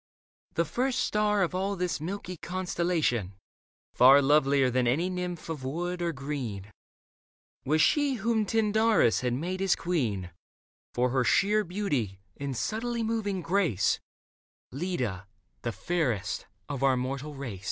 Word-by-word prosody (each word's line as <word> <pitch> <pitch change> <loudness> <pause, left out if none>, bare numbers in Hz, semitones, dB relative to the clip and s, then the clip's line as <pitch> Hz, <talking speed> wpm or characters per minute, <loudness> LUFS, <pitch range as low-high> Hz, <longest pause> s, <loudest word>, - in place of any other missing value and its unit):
The 170 - +2
first 255 - -1
star 210 -4 +2
Of 180 - -1
all 195 +2 -1
this 180 -4 -2
milky 185 +2 -5
constellation, 170 - -1 0.6
far 130 +3 +8
Lovelier 140 -2 +3
than 125 0 +1
any 165 +10 +1
nymph 180 -2 -4
of 155 -5 -5
wood 175 +6 -3
or 170 -1 0
green. 130 -9 -5 0.9
Was 155 +2 +3
she 290 - +3
whom 220 -1 0
Tyndarus 220 - +3
had 125 -1 0
made 180 +7 -3
his 195 -2 +3
queen 115 - -1 0.6
For 125 0 +2
her 130 -1 +2
sheer 210 - +3
beauty 145 - -2 0.2
and 140 -3 -4
subtly 230 - -2
moving 215 -4 -1
grace 165 - +1 0.4
— - - -81
Leda, 125 - -3 0.3
the 120 - -2
fairest 125 - -2 0.2
of 140 -3 -4
our 135 -1 +3
mortal 135 +4 -4
race. 125 -9 -6
165 Hz, 140 wpm, -28 LUFS, 130-195 Hz, 0.9 s, far